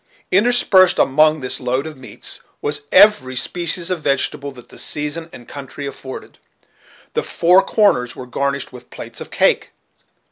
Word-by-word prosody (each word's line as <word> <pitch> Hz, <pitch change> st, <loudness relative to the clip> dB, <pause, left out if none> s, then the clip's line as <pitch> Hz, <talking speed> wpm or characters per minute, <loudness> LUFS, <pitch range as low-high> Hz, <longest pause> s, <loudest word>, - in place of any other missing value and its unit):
Interspersed 190 Hz, -3 st, +4 dB
among 155 Hz, +2 st, +3 dB
this 130 Hz, -, 0 dB
load 130 Hz, +2 st, -2 dB
of 160 Hz, -1 st, -7 dB
meats 130 Hz, -1 st, -3 dB, 0.2 s
was 145 Hz, 0 st, -2 dB
every 195 Hz, -10 st, +5 dB
species 175 Hz, +5 st, 0 dB
of 180 Hz, -3 st, -2 dB
vegetables 140 Hz, 0 st, -2 dB
that 125 Hz, -, -14 dB
the -, -, -11 dB
season 150 Hz, +3 st, -2 dB
and 120 Hz, -, -13 dB
country 140 Hz, 0 st, -8 dB
afforded. 135 Hz, -1 st, -9 dB, 0.7 s
The -, -, 0 dB
four 180 Hz, +3 st, +3 dB
corners 195 Hz, -, +1 dB
were 130 Hz, -, -8 dB
garnished 140 Hz, +2 st, -3 dB
with 125 Hz, -, -13 dB
plates -, -, -9 dB
of -, -, -8 dB
cake. -, -, +1 dB
145 Hz, 150 wpm, -19 LUFS, 130-180 Hz, 0.7 s, every